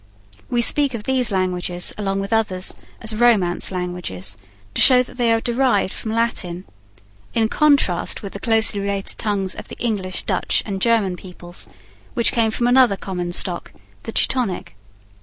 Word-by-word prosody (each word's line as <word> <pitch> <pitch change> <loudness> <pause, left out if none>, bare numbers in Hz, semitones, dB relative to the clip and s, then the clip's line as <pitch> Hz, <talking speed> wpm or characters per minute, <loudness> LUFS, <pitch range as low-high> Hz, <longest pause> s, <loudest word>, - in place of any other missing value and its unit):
We 240 -1 +1
speak 280 0 +3
of 215 - -6
these 255 -1 +1
languages, 180 -2 0
along 195 -1 -2
with 195 +3 -3
others, 195 -4 0 0.3
as 220 -1 -2
Romance 215 -8 +2
languages, 180 - -4 0.4
to - - 0
show 255 -1 +7
that 250 - -15
they 240 -2 +2
are 225 - +3
derived 240 -5 +1
from 220 - -5
Latin, 195 -6 -1 0.7
in 225 -1 +3
contrast 280 - +2
with 200 - -7
the 200 - -6
closely 220 -2 +2
related 200 0 -3
tongues 200 -3 0
of - - -8
the - - -10
English, 195 -6 -2
Dutch, 190 -3 0
and 195 -3 -4
German 215 -6 +2
peoples, 175 -1 -10 0.5
which 235 - +4
came 230 -3 +2
from 235 +2 -1
another 245 -4 +5
common 180 -2 -4
stock, - - 0 0.3
the - - -6
Teutonic. 225 - 0
205 Hz, 160 wpm, -20 LUFS, 185-235 Hz, 0.7 s, show